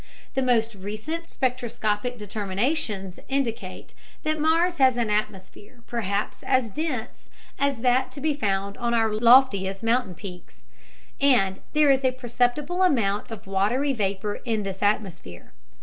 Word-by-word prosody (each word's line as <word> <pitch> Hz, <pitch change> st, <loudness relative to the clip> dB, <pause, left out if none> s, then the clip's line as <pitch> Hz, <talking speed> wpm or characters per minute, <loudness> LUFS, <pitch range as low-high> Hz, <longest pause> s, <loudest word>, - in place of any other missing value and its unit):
The 265 Hz, -, 0 dB
most 230 Hz, -3 st, +2 dB
recent 215 Hz, -, -6 dB
spectroscopic 245 Hz, -2 st, -1 dB
determinations 205 Hz, -, -2 dB
indicate 270 Hz, -4 st, -3 dB, 0.3 s
that 310 Hz, 0 st, 0 dB
Mars 335 Hz, +3 st, +2 dB
has 260 Hz, -3 st, +4 dB
an 230 Hz, -3 st, 0 dB
atmosphere 210 Hz, +3 st, -4 dB
perhaps 205 Hz, -3 st, -2 dB
as 255 Hz, -4 st, +1 dB
dense 300 Hz, -4 st, -4 dB, 0.3 s
as 280 Hz, -4 st, 0 dB
that 255 Hz, +1 st, +2 dB
to -, -, -8 dB
be 305 Hz, +1 st, +1 dB
found 200 Hz, -6 st, -2 dB
on 235 Hz, 0 st, 0 dB
our 225 Hz, -2 st, +2 dB
loftiest 215 Hz, -4 st, +4 dB
mountain 230 Hz, -5 st, +1 dB
peaks, 180 Hz, -1 st, -11 dB, 0.6 s
and 220 Hz, -9 st, +3 dB
there 300 Hz, -2 st, +5 dB
is 270 Hz, 0 st, +2 dB
a 260 Hz, -1 st, +2 dB
perceptible 255 Hz, +7 st, -1 dB
amount 225 Hz, -, +2 dB
of 225 Hz, -3 st, -8 dB
watery 215 Hz, +9 st, +1 dB
vapor 205 Hz, -2 st, -2 dB
in 220 Hz, -3 st, -1 dB
this 195 Hz, -1 st, -5 dB
atmosphere. 190 Hz, -, -2 dB
235 Hz, 135 wpm, -25 LUFS, 200-265 Hz, 0.6 s, there